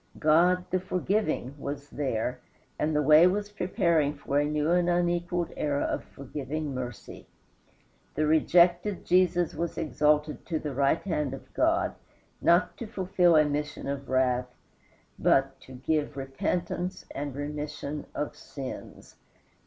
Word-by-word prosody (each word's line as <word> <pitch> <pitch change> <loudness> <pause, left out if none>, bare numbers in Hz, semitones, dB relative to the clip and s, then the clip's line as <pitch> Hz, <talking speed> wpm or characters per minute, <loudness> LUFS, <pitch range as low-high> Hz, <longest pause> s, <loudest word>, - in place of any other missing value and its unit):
God, 175 +4 +4
the 185 - +2
forgiving, 185 - -1
was 145 +1 -6
there, 125 -3 -2 0.4
and 150 0 0
the 150 - +2
way 155 +4 +7
was 205 +2 -1
preparing 170 -6 +1
for 140 - -1
a 145 - +2
new 150 +2 0
and 175 0 +3
unequaled 175 0 0
era 145 -1 0
of - - -2
forgiving 145 +2 -5
mercy. 125 -2 -7 0.9
The 155 - +1
rejected 175 +5 +3
Jesus 175 -1 +3
was 170 0 -3
exalted 150 -1 +1
to 165 - -1
the 150 -2 -4
right 140 +4 +2
hand 150 -8 -1
of - - -15
God, - - +2 0.5
not 170 +1 +3
to 235 - -6
fulfill 180 -4 +2
a 155 -1 +6
mission 150 0 -3
of 140 0 -4
wrath, 125 -1 +2 0.7
but 135 0 +2
to 130 - -13
"give 145 +2 -1
repentance 170 +7 -3
and 140 -1 -4
remission 150 0 -5
of 150 0 -3
sins." 135 -2 -9
150 Hz, 135 wpm, -28 LUFS, 140-175 Hz, 0.9 s, way